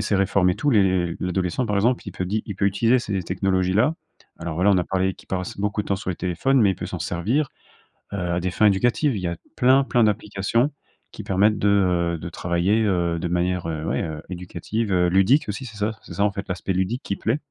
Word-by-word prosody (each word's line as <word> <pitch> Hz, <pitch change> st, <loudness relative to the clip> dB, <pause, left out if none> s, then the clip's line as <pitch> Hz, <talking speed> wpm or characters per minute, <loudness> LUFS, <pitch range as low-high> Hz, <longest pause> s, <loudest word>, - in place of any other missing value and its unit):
ces 100 Hz, 0 st, +1 dB
réformes 95 Hz, -1 st, +3 dB
et 90 Hz, -, -2 dB
tout, 145 Hz, -, -1 dB
les 95 Hz, -6 st, +2 dB
l'adolescent, 90 Hz, +5 st, -1 dB
par 105 Hz, -3 st, -1 dB
exemple, 120 Hz, +5 st, +2 dB
il -, -, -4 dB
peut 95 Hz, -, -4 dB
di 105 Hz, +4 st, -1 dB
il 100 Hz, -, -6 dB
peut 100 Hz, -, 0 dB
utiliser 115 Hz, +5 st, +3 dB
ces 100 Hz, -5 st, -2 dB
technologies-là. 95 Hz, -, +1 dB, 0.5 s
Alors 85 Hz, -1 st, -4 dB
voilà, 90 Hz, +4 st, +3 dB
on 95 Hz, -, +3 dB
a -, -, +2 dB
parlé 95 Hz, +1 st, 0 dB
qu'il -, -, -19 dB
passe 90 Hz, -1 st, -3 dB
beaucoup 105 Hz, +1 st, 0 dB
de -, -, -13 dB
temps 100 Hz, -, +1 dB
sur 95 Hz, -1 st, -4 dB
les 90 Hz, -, -4 dB
téléphones, 110 Hz, +10 st, +1 dB
mais 105 Hz, -3 st, +5 dB
il 95 Hz, -, -1 dB
peut -, -, -6 dB
s'en -, -, -5 dB
servir, 115 Hz, -, -1 dB, 0.7 s
heu, -, -, -2 dB
à 90 Hz, -1 st, -1 dB
des 90 Hz, +1 st, -1 dB
fins 105 Hz, -, +2 dB
éducatives. 120 Hz, +7 st, +2 dB
Il 100 Hz, -, -3 dB
y 90 Hz, -, -2 dB
a 85 Hz, -, -2 dB, 0.2 s
plein 130 Hz, +2 st, +4 dB
plein 120 Hz, -3 st, +2 dB
d'applications 105 Hz, +5 st, 0 dB, 0.4 s
qui -, -, -8 dB
permettent 100 Hz, +2 st, +2 dB
de, 105 Hz, -, +1 dB, 0.5 s
heu, -, -, -4 dB
de 85 Hz, +2 st, -6 dB
travailler, 85 Hz, +5 st, 0 dB
heu, 85 Hz, -4 st, 0 dB
de 90 Hz, -, -2 dB
manière, 90 Hz, 0 st, -1 dB
heu, 80 Hz, -2 st, -3 dB
ouais, -, -, -1 dB, 0.3 s
éducative, 90 Hz, +5 st, -4 dB, 0.2 s
ludique 95 Hz, +12 st, +3 dB
aussi. 105 Hz, +6 st, -4 dB
C'est 110 Hz, -3 st, -10 dB
ça 105 Hz, +1 st, 0 dB
c'est -, -, -11 dB
ça, 100 Hz, -, +1 dB
en 105 Hz, -, +2 dB
fait, 100 Hz, 0 st, -6 dB
l'aspect 90 Hz, +1 st, -2 dB
ludique 95 Hz, +8 st, -1 dB
qui 100 Hz, -, -2 dB
plaît. 115 Hz, +7 st, 0 dB
95 Hz, 235 wpm, -23 LUFS, 90-110 Hz, 0.7 s, mais